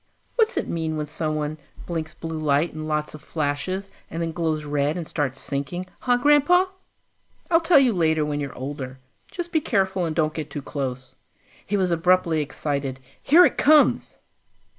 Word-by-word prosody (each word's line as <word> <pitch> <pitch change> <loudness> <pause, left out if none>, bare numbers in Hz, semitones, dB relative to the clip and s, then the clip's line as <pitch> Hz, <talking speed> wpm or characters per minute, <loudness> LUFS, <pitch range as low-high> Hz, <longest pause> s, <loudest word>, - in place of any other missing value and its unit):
"What's 460 -1 +2
it - - -1
mean 160 -2 -2
when 150 - -2
someone 155 0 -2 0.3
blinks 160 -2 -4
blue 160 -1 -5
light 150 +2 +1
in 155 0 -5
lots 150 -1 -2
of 155 - -10
flashes, 165 +6 -3 0.2
and 165 - -5
then 165 -1 -1
glows 160 -2 -1
red 145 +2 0
and 170 - -4
starts 135 -4 -2
sinking, 140 +6 -4
huh, 245 -1 +2
Grandpa?" 295 +7 +5 0.9
"I'll 330 0 +5
tell 330 -1 +5
you 260 -4 +5
later 160 -4 +2
when 145 -1 -2
you're 140 -2 -5
older. 130 0 -6 0.3
Just 350 -3 -6
be 320 -3 +2
careful 190 -7 0
and 160 -1 -3
don't 155 -2 +1
get 155 -2 -5
too 145 0 -6
close." 130 -2 -5 0.5
He 205 - -1
was 185 -2 +1
abruptly 170 -1 +3
excited. 140 -2 -3 0.2
"Here 345 +5 +7
it - - 0
comes!" 300 0 +4
160 Hz, 175 wpm, -24 LUFS, 145-190 Hz, 0.9 s, Here